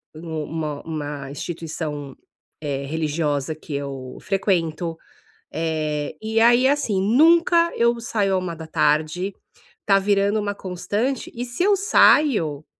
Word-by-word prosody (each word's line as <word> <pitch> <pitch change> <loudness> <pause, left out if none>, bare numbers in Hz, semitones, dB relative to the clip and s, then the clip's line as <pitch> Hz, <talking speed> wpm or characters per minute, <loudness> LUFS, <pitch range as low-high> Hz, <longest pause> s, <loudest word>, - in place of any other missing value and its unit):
um 160 -1 -5
uma 155 -1 -4
uma 145 -3 -5
instituição, 150 -3 -5 0.5
eh, 140 -2 -3
religiosa 150 -1 -1
que 155 0 -10
eu 135 -2 -6
frequento, 170 -4 -1 0.6
eh, 155 -2 -2
e 220 +1 0
aí, 240 +3 +5
assim, 270 -9 +1
nunca 335 - +4
eu 235 0 +2
saio 205 -4 0
à - - +2
13h, 160 +1 -1 0.5
tá 195 -1 +5
virando 200 +1 +2
uma 205 0 -2
constante, 205 +8 -3
e 240 +1 -4
se 245 +8 -2
eu 405 +1 +4
saio, 220 - +3
170 Hz, 120 wpm, -22 LUFS, 150-220 Hz, 0.6 s, aí